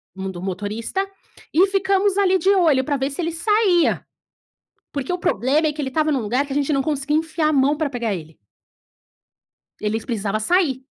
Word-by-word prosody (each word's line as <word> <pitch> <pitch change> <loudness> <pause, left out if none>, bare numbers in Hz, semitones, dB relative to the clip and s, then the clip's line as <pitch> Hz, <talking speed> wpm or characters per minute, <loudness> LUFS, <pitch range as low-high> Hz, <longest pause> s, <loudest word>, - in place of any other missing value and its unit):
mun 190 0 -4
do 175 -1 -8
motorista, 210 - -3 0.5
e 360 +5 +5
ficamos 390 0 +1
ali 380 -2 +4
de 370 +3 +1
olho, 305 -8 +3
para 290 - 0
ver 270 0 -1
se 280 - -4
ele 330 - -1
saía, 385 -1 +2 0.9
porque 280 +4 -3
o 360 - -1
problema 300 - +1
é 300 - -1
que 300 - -5
ele 270 - -2
estava 310 +2 +1
em - - +1
um - - 0
lugar, 250 +7 0
que 280 - -7
a - - -2
gente 290 +1 +1
não 275 - +2
conseguia 295 0 -1
enfiar 320 0 -1
a - - +1
mão 280 +1 +3
para 305 -3 -1
pegar 235 -5 -2
ele. 160 -3 -9 1.5
Eles 215 +1 -2
precisava 215 -3 -2
sair 270 - +1
290 Hz, 200 wpm, -21 LUFS, 235-345 Hz, 1.5 s, e